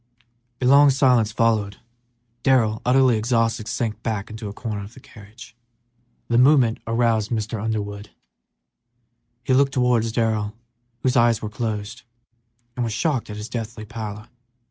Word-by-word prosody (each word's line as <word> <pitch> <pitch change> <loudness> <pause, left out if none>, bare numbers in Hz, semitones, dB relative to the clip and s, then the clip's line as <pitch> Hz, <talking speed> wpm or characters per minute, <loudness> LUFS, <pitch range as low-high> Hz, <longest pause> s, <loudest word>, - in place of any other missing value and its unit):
A 125 - -2
long 140 +2 +7
silence 125 -5 +3
followed. 110 -2 0 0.6
Darrell, 115 -5 +2
utterly 125 -2 +3
exhausted, 115 -1 0
sank 110 -2 -3
back 110 -2 -3
into 110 -1 -6
a - - -6
corner 105 -1 -5
of 105 +4 -12
the - - -12
carriage. 115 0 -15 0.7
The 120 - +1
slight 125 - +6
movement 130 -5 +4
roused 115 -2 +1
Mr. 110 -1 -3
Underwood; 105 -2 -4 1.3
he 130 - +1
looked 135 +1 +3
towards 120 -3 +2
Darrell, 110 -2 -1 0.5
whose 130 0 +1
eyes 115 -2 +3
were 105 - -3
closed, 110 0 -4 0.7
and 125 - -2
was 115 -2 -2
shocked 130 0 -1
at 105 - -6
his 105 +1 -6
deathly 115 -2 -6
pallor. 110 -1 -7
115 Hz, 145 wpm, -22 LUFS, 105-125 Hz, 1.3 s, long